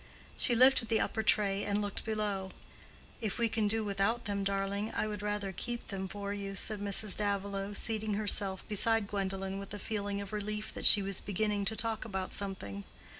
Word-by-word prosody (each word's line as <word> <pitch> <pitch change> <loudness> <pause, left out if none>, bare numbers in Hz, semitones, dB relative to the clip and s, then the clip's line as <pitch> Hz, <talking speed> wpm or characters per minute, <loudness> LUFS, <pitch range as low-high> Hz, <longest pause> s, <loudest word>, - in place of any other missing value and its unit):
She 240 - +4
lifted 255 -1 +6
the 225 -1 +2
upper 220 - 0
tray 200 -2 +2
and 205 0 0
looked 205 -1 -3
below. 205 -4 -2 0.7
"If 215 -3 -2
we 235 -1 +2
can 220 -1 +1
do 220 +1 +1
without 205 +4 0
them, 200 -2 -1
darling, 200 +2 -1
I - - +1
would 210 -2 -4
rather 205 -1 -2
keep 235 +6 -5
them 190 -1 -3
for 200 +1 -4
you," 200 -1 -5
said 210 +2 -1
Mrs. 200 0 0
Davilow, 200 -1 -2
seating 220 -1 0
herself 200 -2 0
beside 225 +1 +3
Gwendolen 195 -1 -3
with 200 +1 -7
a - - -5
feeling 205 -1 -3
of 200 0 -7
relief 210 0 -3
that - - +3
she 205 - +9
was 195 -1 -1
beginning 205 0 -1
to 220 - -1
talk 225 -1 -2
about 190 -4 -3
something. 140 - -4
205 Hz, 190 wpm, -32 LUFS, 195-215 Hz, 0.7 s, she